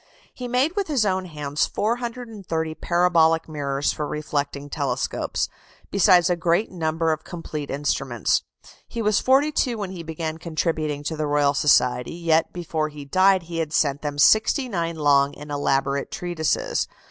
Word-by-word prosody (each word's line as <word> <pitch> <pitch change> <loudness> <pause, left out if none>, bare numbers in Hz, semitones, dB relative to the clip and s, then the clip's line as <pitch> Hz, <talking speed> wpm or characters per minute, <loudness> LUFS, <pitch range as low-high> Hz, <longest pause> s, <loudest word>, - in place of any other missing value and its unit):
He 250 - -6
made 260 +8 +1
with 405 -2 -1
his 275 -8 +1
own 190 -1 0
hands 150 -3 -2
430 220 -8 -3
parabolic 165 -1 +2
mirrors 140 -2 -1
for 150 - -3
reflecting 145 -2 -3
telescopes, 140 -4 -2 0.4
besides 180 -3 +5
a 180 - +2
great 170 +5 +1
number 165 -2 0
of 155 0 -3
complete 155 -4 -6
instruments. 135 -5 0 0.5
He 230 - -4
was 210 -1 +3
forty 275 +4 +3
two 250 -5 0
when 200 -3 -4
he 180 -3 -7
began 160 0 -5
contributing 155 -3 -2
to 160 +2 -3
the 155 -1 -2
Royal 145 -1 +2
Society; 125 -1 +2
yet 165 -1 +1
before 160 -3 -2
he 145 -1 -10
died 185 +4 +3
he 165 0 -5
had 160 -1 -2
sent 140 -3 +1
them 145 -1 -4
sixty 220 - +4
nine 170 -6 -2
long 145 -2 +3
and 150 0 -9
elaborate 140 -1 0
treatises. 175 -4 -1
160 Hz, 160 wpm, -23 LUFS, 145-185 Hz, 0.5 s, besides